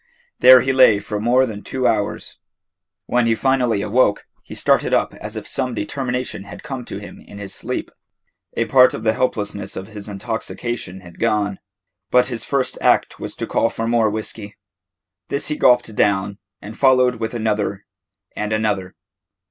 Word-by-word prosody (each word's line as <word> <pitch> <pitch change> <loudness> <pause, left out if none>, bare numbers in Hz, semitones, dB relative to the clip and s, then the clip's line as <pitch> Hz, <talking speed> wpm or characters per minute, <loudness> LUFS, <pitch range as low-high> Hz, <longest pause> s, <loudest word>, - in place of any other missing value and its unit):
There 130 0 +9
he 130 0 0
lay 130 -5 +6
for 105 +1 -4
more 125 +4 +3
than 105 -4 -6
two 130 +3 -3
hours. 105 -4 -1 0.7
When 120 -1 +1
he 115 - +3
finally 125 -5 +1
awoke, 105 -1 +2 0.2
he - - -11
started - - +2
up - - 0
as - - -8
if - - -6
some 125 -2 -2
determination 125 -1 -3
had 100 - -10
come 130 -3 -6
to - - -6
him 100 - -10
in 100 - -13
his 100 -1 -7
sleep. - - -4 0.7
A 115 - +2
part 130 0 +5
of 110 - -7
the 110 -1 +3
helplessness 105 -5 -2
of 95 +2 -7
his 105 -1 -8
intoxication 110 -1 -5
had 85 -2 -14
gone, 105 -3 0 0.5
but 125 0 +3
his 115 - -4
first 135 -2 -1
act - - +2
was - - -6
to - - -4
call 115 - +1
for 115 - -4
more 115 -1 +2
whiskey. 110 -1 -5 0.7
This 140 - -1
he 150 - -1
gulped 120 -5 +3
down, 100 0 +1 0.2
and 110 +2 -8
followed 130 -2 +4
with 115 +1 -4
another 105 -3 -1 0.5
and 105 0 -3
another. 105 -4 -1
110 Hz, 170 wpm, -20 LUFS, 105-125 Hz, 0.7 s, There